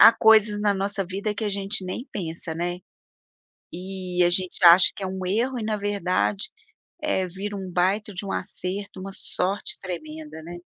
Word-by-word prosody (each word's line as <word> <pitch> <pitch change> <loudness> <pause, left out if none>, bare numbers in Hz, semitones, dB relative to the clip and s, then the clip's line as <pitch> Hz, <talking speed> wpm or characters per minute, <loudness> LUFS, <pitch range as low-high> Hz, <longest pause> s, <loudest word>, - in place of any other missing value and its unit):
há 225 - +11
coisas 220 -2 +5
na 205 -1 +2
nossa 195 +1 -1
vida 200 +3 -3
que 220 - -3
a 210 - +1
gente 195 -1 0
nem 185 +8 -5
pensa, 165 -3 -4
né? 175 +2 -2 0.9
E 180 0 -3
a 175 - +4
gente 185 +1 -1
acha 175 +2 +9
que - - -8
é - - -1
um 185 0 -4
erro 240 +7 0
e, 220 - -3
na 215 0 0
verdade, 200 -1 0 0.5
eh, 190 -11 +1
vira 200 +3 -5
um 190 -2 -6
baita 190 +4 +1
de 180 +3 -4
um - - -3
acerto, 190 +1 -4
uma 195 +1 -6
sorte 190 +1 -1
tremenda, 155 -3 -7
né? 175 +2 -8
190 Hz, 185 wpm, -25 LUFS, 180-205 Hz, 0.9 s, há